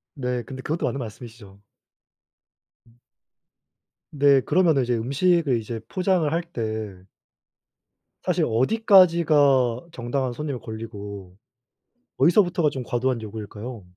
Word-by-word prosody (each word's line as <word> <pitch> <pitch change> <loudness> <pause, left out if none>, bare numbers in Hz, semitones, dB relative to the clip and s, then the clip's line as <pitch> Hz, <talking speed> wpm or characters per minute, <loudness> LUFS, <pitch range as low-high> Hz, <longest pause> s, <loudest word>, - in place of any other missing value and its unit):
네. 125 -3 -3
근데 130 +3 -9
그것도 155 +5 -2
맞는 140 - -2
말씀이시죠. 110 -4 -10 1.3
음. 115 +1 -26 1.1
네. 140 -2 +4
그러면은 160 -2 +2
이제 120 0 -1
음식을 140 +4 +1
이제 115 +1 -6
포장을 185 -4 0
할 170 - +1
때 110 - -5 1.2
사실 - - +1
어디까지가 150 - +3
정당한 125 -1 -3
손님의 140 -1 -5
권리고 100 -4 -8 0.8
어디서부터가 175 -3 +3
좀 130 -3 -6
과도한 120 0 -1
요구일까요? 110 +1 -8
130 Hz, 265 characters per minute, -24 LUFS, 115-155 Hz, 1.3 s, 네